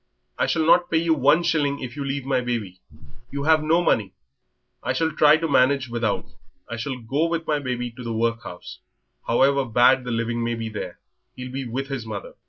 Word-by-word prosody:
"I - - +2
shall 160 -1 +1
not 175 +2 +4
pay 165 - +2
you 165 0 +2
one 150 +3 +3
shilling 145 -4 +1
if 125 -1 -7
you 145 - -4
leave 135 -1 -3
my 135 -2 +1
baby. 110 -7 -4 0.5
You 140 0 -4
have 155 +1 +4
no 165 +3 +2
money." 105 - +1 0.7
"I - - -1
shall 160 -1 0
try 150 0 +5
to 165 +1 -2
manage 135 -2 +3
without. 115 -3 -2 0.4
I 120 - -5
shall 125 +3 -4
go 135 +7 -1
with 165 -1 -2
my 150 -2 0
baby 125 -3 -3
to 125 +2 -10
the 115 - -4
workhouse. 115 -5 -3 0.5
However 135 +4 +3
bad 125 +2 +4
the 125 - -6
living 115 0 -1
may 120 0 -1
be 115 -1 -4
there, 100 -5 -6 0.4
he'll 125 0 -7
be 135 0 -4
with 135 +4 -4
his 135 -4 -4
mother." 110 -3 -7
130 Hz, 205 wpm, -23 LUFS, 115-150 Hz, 0.7 s, try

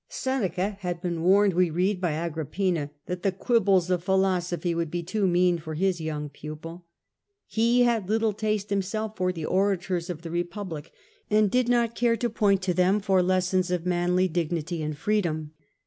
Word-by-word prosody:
Seneca 200 -6 -2
had 175 -3 -3
been 170 -2 -3
warned, 195 +3 +4
we 180 0 +3
read, 180 +4 0
by 175 -4 0
Agrippina 165 0 -2 0.2
that 180 0 -4
the 195 - +1
quibbles 190 -3 +2
of 175 -2 0
philosophy 180 -2 +1
would 165 -1 -2
be 175 +2 -3
too 195 +3 0
mean 175 -1 +3
for 155 0 -6
his 180 0 0
young 150 -2 -3
pupil. 155 +4 -9 0.6
He 235 +2 +3
had 230 -5 +1
little 220 0 +2
taste 210 -1 -2
him 200 -1 +2
self 215 +3 -4
for 185 -2 0
the 165 -4 -5
orators 185 -2 0
of 170 -2 -5
the 165 - -6
Republic, 175 -2 -4 0.4
and 210 -1 +3
did 250 0 +2
not 235 -1 +2
care 235 -1 +2
to 240 +1 -1
point 200 -3 +2
to 185 -1 +1
them 185 +3 +3
for 190 -2 +2
lessons 185 0 +1
of 180 -1 -1
manly 180 +1 +2
dignity 170 -1 -2
and 150 -1 -3
freedom. 165 -8 -1
180 Hz, 180 wpm, -26 LUFS, 170-205 Hz, 0.6 s, warned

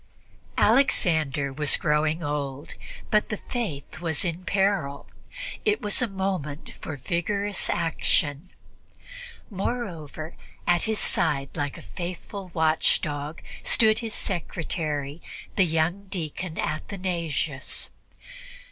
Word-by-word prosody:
Alexander 155 - +3
was 150 +1 +4
growing 155 +2 +2
old, 145 -1 -3 0.4
but 210 0 +4
the 215 - -1
Faith 155 - -4
was 165 +1 +2
in 175 +1 -2
peril; 190 -8 +1 0.6
it 425 0 +3
was 205 +4 +3
a 250 - +3
moment 190 -7 -2
for 155 - -4
vigorous 200 +8 -1
action. 160 -1 +2 1.0
Moreover, 175 - -3 0.3
at 175 -1 +3
his 220 -1 +1
side, 140 -9 +1
like 145 -1 -2
a - - -10
faithful 180 - -6
watchdog, 155 -1 +1 0.2
stood 220 -1 +5
his 225 -2 -3
secretary, 155 -4 -2 0.3
the 195 - +5
young 170 +5 +1
deacon 170 -1 -3
Athanasius. 165 -5 -1
165 Hz, 105 wpm, -27 LUFS, 150-195 Hz, 1.0 s, stood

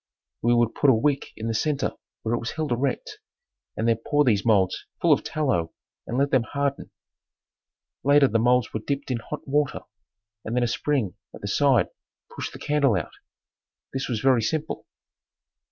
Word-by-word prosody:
We 120 +1 +3
would 120 -1 +2
put 145 - +3
a 130 - +6
wick 140 +5 +1
in 110 - -5
the 115 - 0
center 145 +5 0 0.3
where 110 - -1
it 120 - +1
was 115 - -4
held 155 -3 -3
erect 125 +2 -2 0.6
and 115 - 0
then 115 -1 +3
pour 145 0 +3
these 110 -7 +2
molds 100 -5 +2
full - - +5
of - - 0
tallow 130 - -1 0.3
and 120 - -2
let 140 +1 +2
them 130 -4 +4
harden. 140 +4 -2 1.1
Later 145 0 +6
the 115 - +1
molds 125 +1 +2
were 110 - -1
dipped 140 +4 -3
in 120 - 0
hot 150 +6 -7
water 145 0 +1 0.6
and 110 - -3
then 125 - +2
a - - +2
spring 120 -5 -1 0.2
at - - -12
the 100 - -4
side, 135 +1 +3 0.5
pushed - - -4
the - - -9
candle 140 -6 +2
out. 85 - -2 0.8
This 135 0 -3
was 115 -3 -1
very 130 -3 +4
simple. 155 +7 -2
125 Hz, 185 wpm, -25 LUFS, 115-140 Hz, 1.1 s, a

